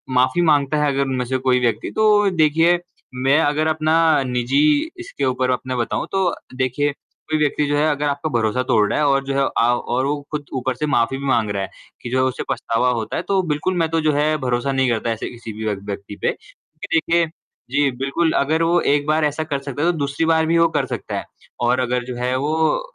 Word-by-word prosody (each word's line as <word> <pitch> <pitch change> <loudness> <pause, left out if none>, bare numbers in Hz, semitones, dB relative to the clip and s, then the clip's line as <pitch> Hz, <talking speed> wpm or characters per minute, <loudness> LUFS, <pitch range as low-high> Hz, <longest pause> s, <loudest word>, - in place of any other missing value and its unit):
माफ़ी 130 +6 +3
माँगता 145 0 +2
है - - +2
अगर 135 - 0
उनमें 130 -2 -2
से 130 +2 -1
कोई 130 -1 +2
व्यक्ति 115 -3 -1
तो 210 -2 +4
देखिए 165 0 +3 0.4
मैं 140 +4 +4
अगर 155 +1 +1
अपना 155 0 +1 0.3
निजी 125 - 0 0.4
इसके 330 - -4
ऊपर 130 0 0
अपना 130 0 -2
बताऊँ 120 -2 -2
तो 190 -2 +2 0.3
देखिए 130 +3 0 0.4
कोई 155 - +1
व्यक्ति 150 0 +1
जो 145 - 0
है 150 - +2
अगर 150 0 -1
आपका 145 +2 -2
भरोसा 115 +1 +1
तोड़ 105 -1 +4
रहा - - 0
है 150 - +2
और 135 -1 +2
जो 135 - -2
है 140 - +2 0.2
आव 120 +1 +2 0.2
और 130 - +1
वो 145 +1 -1
खुद 150 -1 -4
ऊपर 130 0 -2
से 150 +5 -2
माफ़ी 135 -1 +1
भी 140 - -6
माँग 115 -5 +1
रहा 100 -1 -2
है 95 - -6 0.3
कि 120 - -6
जो 130 - 0
है - - +3
उसे 130 -1 -2
पछतावा 115 +2 0
होता 115 -3 -3
है, - - -1
तो 195 0 +1
बिल्कुल 150 +5 -1
मैं 165 -1 +1
तो 165 0 0
जो 155 0 +2
है 150 +2 +2
भरोसा 130 0 -1
नहीं 135 -1 +1
करता 115 0 -1
ऐसे 115 - -4
किसी 115 -2 -9
भी 110 +1 -6
व्य 105 -1 0
व्यक्ति 100 +1 -7
पे, - - +2
क्योंकि 165 - -8
देखिए 165 +1 +2 0.5
जी, 140 0 +2
बिल्कुल, 140 +5 0
अगर 160 +4 +1
वो 170 +1 +3
एक 145 0 +1
बार 155 0 +2
ऐसा 150 +2 -1
कर 145 -3 -3
सकता 140 +1 -6
है 175 - +4
तो 170 - -6
दूसरी 140 +2 -1
बार 160 0 +3
भी 165 +1 +2
वो 165 0 +5
कर - - -1
सकता - - -5
है। - - -3 0.4
और 120 +1 +2
अगर 125 0 0
जो 125 0 -6
है 125 +1 -1
वो 155 - +1
140 Hz, 240 wpm, -20 LUFS, 125-155 Hz, 0.5 s, वो